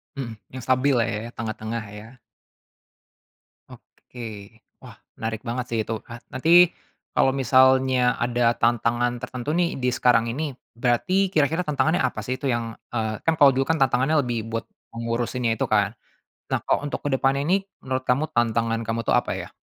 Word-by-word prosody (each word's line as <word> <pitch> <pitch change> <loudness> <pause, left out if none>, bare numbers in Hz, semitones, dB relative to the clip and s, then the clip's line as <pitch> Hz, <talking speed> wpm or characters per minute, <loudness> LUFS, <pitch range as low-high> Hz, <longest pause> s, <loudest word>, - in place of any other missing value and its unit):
Mhm, 115 -5 -6
yang 130 -1 -9
stabil 130 +2 +2
lah 120 - +3
ya, 110 +2 -4
tengah-tengah 110 0 -4
ya. 110 +4 -11 1.6
Oke. 125 - -14 0.6
Wah, - - -11 0.2
menarik 110 -1 -4
banget 120 +1 -2
sih 115 - -1
itu. 110 - -5 0.2
Ah, 120 - -7
nanti 130 +5 -1 0.7
kalau 135 - +4
misalnya 130 +1 +4 0.3
ada 120 0 -1 0.2
tantangan 120 +1 +2
tertentu 125 +2 -5
nih 175 -1 +2
di 125 - +1
sekarang 115 -2 +4
ini 145 +7 -3 0.4
berarti 120 +9 +1 0.2
kira-kira 155 +4 +2
tantangannya 160 +3 +1
apa 125 -4 -1
sih 130 - -1
itu - - -7
yang, 120 0 -1 0.3
eee, 110 -2 -2
kan 165 - +3
kalau 140 -2 +8
dulu 135 +1 +1
tantangannya 135 -1 +2
lebih 120 -3 -2
buat 115 - -3 0.3
mengurusinnya 115 +1 -1
itu - - -1
kan. 105 -2 +3 0.6
Nah, - - +2
kalau - - +2
untuk 145 - -4
ke - - +2
depan 135 +1 +2
ini 180 +7 +1 0.2
menurut 130 0 -2
kamu 130 +5 +2
tantangan 115 -1 +1
kamu 115 +1 -1
tuh - - +2
apa - - -8
ya? - - -8
125 Hz, 165 wpm, -24 LUFS, 115-135 Hz, 1.6 s, kalau